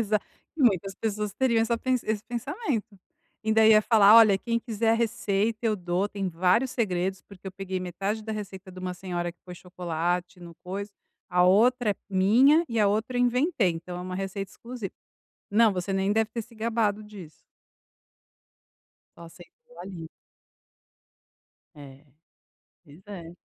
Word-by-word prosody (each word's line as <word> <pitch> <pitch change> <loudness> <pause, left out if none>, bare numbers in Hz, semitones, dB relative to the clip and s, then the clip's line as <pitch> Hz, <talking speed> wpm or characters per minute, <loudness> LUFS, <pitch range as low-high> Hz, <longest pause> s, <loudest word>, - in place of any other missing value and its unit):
Exa 215 -1 +1 0.4
muitas 195 - +2
pessoas 210 -1 -3
teriam 240 -3 +2
essa 230 +1 +1
pe 260 +3 -4
esse 220 -4 0
pensamento. 235 - -4 0.5
E - - -4
ainda 220 0 +5
ia 215 -1 +7
falar: 215 -2 +6
"Olha, 215 -4 +7
quem 230 +2 -1
quiser 225 -1 -1
a - - +4
receita 220 -1 0
eu 215 -1 +1
dou. 180 +2 -1
Tem 200 -2 -3
vários 185 +9 +2
segredos 190 -5 -1
porque 195 -1 -15
eu 190 - -5
peguei 190 0 -4
metade 195 +4 -3
da 220 +1 -5
receita 195 -3 -7
de 185 - -11
uma 180 0 -4
senhora 175 -2 -4
que 175 - -45
pôs 180 -1 -10
chocolate, 180 0 -3
não 170 -1 -10
pôs 195 +3 -5 0.4
a 180 -1 +3
outra 230 +5 +4
é - - 0
minha, 235 - +4
e 230 - -2
a 210 - +4
outra 220 +5 -1
eu - - +2
inventei, 250 - +2
então 175 +2 -7
é - - -6
uma 185 0 -6
receita 195 0 -4
exclusiva". 235 -5 -8 0.6
Não, 220 +1 +4
você 185 +1 -3
nem 195 +1 +1
deve 220 +1 +1
ter 235 - -2
se 230 +1 -17
gabado 220 -2 -1
disso. 200 -7 -11 1.8
Só - - -13
aceitou, 470 - -17
ali. 175 -4 -8 1.7
É, 140 -1 -13 0.8
pois 150 +4 -17
é! 175 -5 -8
200 Hz, 165 wpm, -26 LUFS, 180-225 Hz, 1.8 s, ia